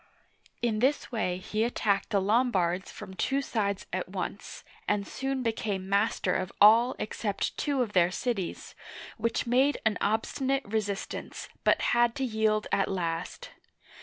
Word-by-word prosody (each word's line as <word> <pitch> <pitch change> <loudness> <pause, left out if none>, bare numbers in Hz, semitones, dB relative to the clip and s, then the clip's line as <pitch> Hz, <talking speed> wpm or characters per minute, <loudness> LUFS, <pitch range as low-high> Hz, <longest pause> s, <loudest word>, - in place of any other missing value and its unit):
In 220 -3 +1
this 270 +5 +1
way 185 -6 -1
he 215 +4 -2
attacked 205 -4 0
the 205 -3 +2
Lombards 190 -4 +1
from 190 - -9
two 270 +8 0
sides 205 -7 -1
at 185 -1 -2
once, 190 +1 -5 0.2
and 205 -1 +1
soon 270 -1 -3
became 210 -4 -2
master 200 -2 +1
of 185 0 -2
all 230 +4 +7
except 210 -1 -2
two 280 -3 0
of 215 -3 -6
their 175 -2 +4
cities, 195 -2 -3 0.4
which 230 +1 -1
made 260 +4 +3
an 220 -1 +2
obstinate 265 +6 0
resistance, 205 -2 -4
but - - +4
had 240 -1 +3
to 270 - -2
yield 215 -2 +1
at 195 - +2
last. 180 - -3
215 Hz, 145 wpm, -29 LUFS, 195-240 Hz, 0.4 s, all